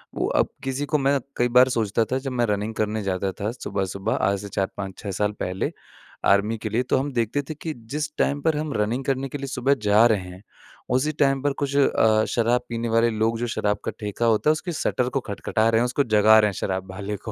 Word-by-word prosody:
वो - - 0
अब - - +2
किसी 135 +1 -2
को 150 +1 +1
मैं 140 0 +2 0.2
कई 120 - +3
बार 130 +1 +7
सोचता 115 -2 +1
था 130 - +2
जब 135 0 -5
मैं 120 -1 +1
रनिंग 105 +1 -2
करने 110 0 -1
जाता 95 0 -1
था 105 +3 -1
सुबह-सुबह 95 -5 -3 0.2
आज 100 -1 0
से 100 - -7
4 95 0 -1
5 95 -1 -6
6 100 -2 -5
साल 105 +2 0
पहले 90 +1 -2 0.5
आर्मी 105 +3 +3
के 110 0 -5
लिए, 115 +4 0
तो - - +1
हम 140 +2 -1
देखते 120 +3 0
थे - - -2
कि 160 +1 -5 0.2
जिस 150 0 -2
टाइम 145 0 +1
पर 160 0 +1
हम 150 -1 -3
रनिंग 115 +6 -1
करने 135 0 -1
के 145 - -5
लिए 140 - -5
सुबह 135 0 +1
जा 105 +3 +5
रहे 110 -3 +2
हैं, 90 +3 -12 0.5
उसी 130 +5 +1
टाइम 135 -2 +3
पर 145 -1 +1
कुछ 140 0 -1
अ, 110 -5 +3
शराब 120 +1 +2
पीने 115 0 -3
वाले 115 +1 +3
लोग 110 +1 0
जो 120 - -1
शराब 105 -2 0
का - - -1
ठेका 105 +2 -2
होता 115 +6 +3
है - - +7
उसके 155 +3 -2
शटर 125 -4 0
को 135 - -1
खटखटा 110 -1 -1
रहे 115 0 +3
हैं, - - +2
उसको 125 +3 +1
जगा 110 -2 +5
रहे 105 - +4
हैं - - -5
शराब 95 0 -3
वाले 100 +2 -4
को, 105 +2 -8
115 Hz, 245 wpm, -24 LUFS, 105-135 Hz, 0.5 s, बार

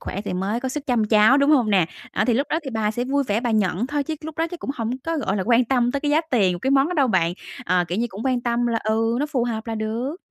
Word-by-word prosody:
khỏe 195 - -5
thì 205 - -5
mới 195 +6 -2
có 260 - -2
sức 290 +2 -5
chăm 240 -5 +2
cháu, 215 +4 +5
đúng 280 +1 +3
hông 250 -8 +3
nè?" 190 -5 +3 0.3
À, - - +1
thì 245 - +2
lúc 275 +5 0
đó 315 - +1
thì 270 - -5
bà 220 -3 0
sẽ 240 +3 -3
vui 280 +2 0
vẻ 215 0 0
bà 240 - -1
nhận 210 0 +1
thôi 290 +1 -1
chứ 320 +1 -3
lúc 315 0 -9
đó 325 - +1
chắc 350 - -8
cũng - - -4
hổng 230 -3 -3
có, 330 0 -1
gọi 205 -8 -1
là, 195 - -1
quan 240 +1 +4
tâm 245 -1 +1
tới 280 - -1
cái 295 - -1
giá 305 +2 +4
tiền 190 -8 +2
cái 265 - -1
món 275 +2 +4
đó 360 - -3
đâu 280 -4 +3
bạn. 175 -5 +2 0.3
Ờ, 180 -3 +2
kiểu 180 +4 -2
như, 235 - +1
cũng 205 +1 -8
quan 255 -2 +1
tâm 240 0 0
là 230 -1 0
ừ, 225 +2 +1
nó 295 - 0
phù 260 -5 -1
hợp 225 -2 -4
là 225 - -3
được. 225 +7 -3
240 Hz, 320 wpm, -22 LUFS, 215-275 Hz, 0.3 s, cháu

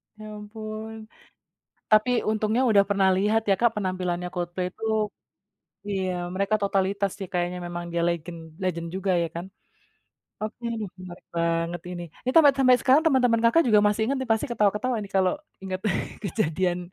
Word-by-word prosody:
Ya 215 0 -11
ampun, 215 +1 -7 1.0
tapi 215 +3 +5 0.2
untungnya 220 +3 +1
udah 200 -2 +6
pernah 195 -1 +3
lihat 210 +3 +2
ya, 195 - +5
Kak, 235 - +5
penampilannya 180 -3 -2
Coldplay 175 +1 -2
itu - - -9 1.1
iya, 190 -2 -1 0.2
mereka 200 +3 +1
totalitas 195 0 0
sih 195 -2 -6
kayaknya 180 0 -1
memang 175 0 -5
dia 170 - 0
legend 170 0 -4 0.2
legend 170 -2 -2
juga 190 0 -1
ya 170 - -1
kan? 170 - -4 1.0
Oke, 215 +2 -5 0.2
duh, 205 - -3
menarik 180 -1 -11
banget 170 0 0
ini. 175 -1 -5 0.2
Ini 255 - 0
tampe 320 -3 +8
sampai 255 -2 +6
sekarang 270 +4 +5
teman-teman 250 -6 +3
Kakak 280 +9 +5
juga 210 -2 +6
masih 210 +1 0
inget 270 +4 0
nih 260 - -4
pasti 220 - 0
ketawa-ketawa 210 +2 +1
nih 195 - -10
kalau 185 -1 +3 0.3
inget 190 -1 -4 0.4
kejadian. 180 -3 0
200 Hz, 160 wpm, -25 LUFS, 180-220 Hz, 1.1 s, tampe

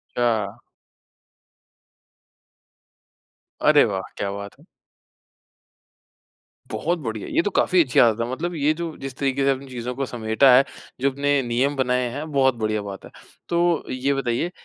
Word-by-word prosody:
छा 115 -3 0 3.0
अरे 150 -1 +6
वाह! 95 -3 -2
क्या 100 - -2
बात 100 0 -8
है! - - -20 2.0
बहुत 170 +3 -1
बढ़िया, 110 -8 -5
ये - - +1
तो 205 - -1
काफ़ी 185 -2 +3
अच्छी 130 -5 -1
आदत 115 -2 +5
है। 115 +1 -1
मतलब 175 +7 -3
ये 150 -1 +2
जो 165 -1 -5
जिस 135 -1 -6
तरीके 135 0 0
से 140 - -12
चीजों 125 0 -5
को 135 +1 -2
समेटा 120 +2 +3
है 130 +2 +6 0.4
जो 140 +2 +2
अपने 140 +1 +1
नियम 125 +4 0
बनाए 125 -1 +1
हैं 145 +5 -6
बहुत 135 -2 +3
बढ़िया 110 -2 -1
बात 100 -1 -8
है। - - -11 0.4
तो 170 -1 +1
ये 130 +2 0
बताइए 135 +4 -1
130 Hz, 150 wpm, -23 LUFS, 115-145 Hz, 3.0 s, अरे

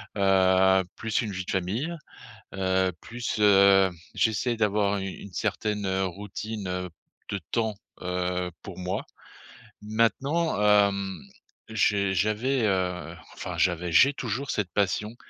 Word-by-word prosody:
heu, 95 -1 +4
plus 115 -1 -1
une 105 - -4
vie 95 -1 -4
de - - -4
famille, 100 - -1 0.6
heu, 95 -1 +1
plus, 120 -1 -4
heu, 100 -2 +6 0.2
j'essaie 115 +2 +1
d'avoir 105 -2 +1
u 95 - -3
une 95 0 -8
certaine, 105 +3 -2
heu, 95 0 0
routine, 100 +2 -5
heu, 90 0 -3 0.4
de 100 - -2
temps, 110 -2 0 0.3
heu, 90 0 -2
pour 95 -2 -9
moi. 90 +1 -3 0.8
Maintenant, 115 +7 +1
hem, 100 -2 +3 0.5
j'ai 100 -2 +1
j'avais, 115 +6 +1
heu, 90 -3 -1 0.2
enfin, - - -5
j'avais, 90 -1 +1
j'ai 130 - +6
toujours 130 +3 -3
cette 100 -4 -1
passion 105 +3 0
100 Hz, 130 wpm, -27 LUFS, 95-110 Hz, 0.8 s, heu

